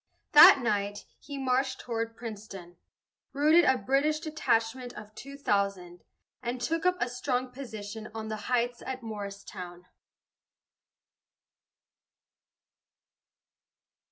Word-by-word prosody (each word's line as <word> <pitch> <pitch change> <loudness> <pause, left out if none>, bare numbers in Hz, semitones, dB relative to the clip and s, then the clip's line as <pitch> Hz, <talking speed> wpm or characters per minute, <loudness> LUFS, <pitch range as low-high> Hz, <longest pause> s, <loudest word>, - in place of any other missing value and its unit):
That 275 - +10
night, 205 -2 -1
he 285 -2 -8
marched 260 0 0
toward 230 -1 -4
Princeton, 205 -6 -8 0.6
routed 310 +5 +5
a 260 - +4
British 275 +7 +1
detachment 250 -6 -1
of 210 0 -11
two 275 +5 -10
thousand, 200 -8 -1 0.4
and 245 0 -3
took 325 +7 0
up 365 0 +2
a 245 - +1
strong 250 +1 -2
position 220 -4 -7
on 220 -1 -5
the 215 - -3
heights 245 -1 0
at 260 -1 -5
Morristown. 200 -4 -7
235 Hz, 100 wpm, -29 LUFS, 205-265 Hz, 0.6 s, That